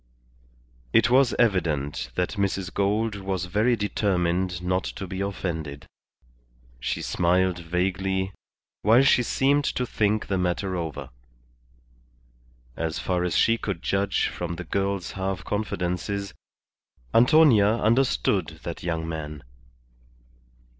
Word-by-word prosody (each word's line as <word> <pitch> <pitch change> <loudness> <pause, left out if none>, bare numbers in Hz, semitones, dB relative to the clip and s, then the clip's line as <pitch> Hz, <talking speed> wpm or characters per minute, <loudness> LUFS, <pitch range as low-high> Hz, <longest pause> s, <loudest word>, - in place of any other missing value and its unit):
It 115 +1 +4
was 130 -1 +4
evident 75 - 0
that 90 - 0
Mrs. 95 -2 -2
Gould 105 +2 0
was 95 -2 -3
very 105 +7 +2
determined 90 -4 0
not 90 +1 0
to 95 - -5
be 95 +1 -5
offended. 80 -7 -4 0.9
She - - -3
smiled 90 +1 +1
vaguely, 95 +3 -1 0.5
while 115 +5 +5
she 135 - +5
seemed 140 +4 +2
to 125 - -1
think 105 -2 0
the 95 -2 -1
matter 90 +1 -1
over. 75 -6 -5 1.6
As 80 -1 -2
far 90 -1 -1
as 90 -2 0
she 115 0 +3
could 95 -5 -4
judge 100 0 +1
from 85 -1 -4
the - - -6
girl's 100 -2 -2
half 95 0 -3
confidences, 100 -1 -3 0.8
Antonia 120 -5 +6
understood 115 - +1
that - - -6
young 80 -2 -2
man. 75 -2 -6
95 Hz, 115 wpm, -25 LUFS, 90-105 Hz, 1.6 s, Antonia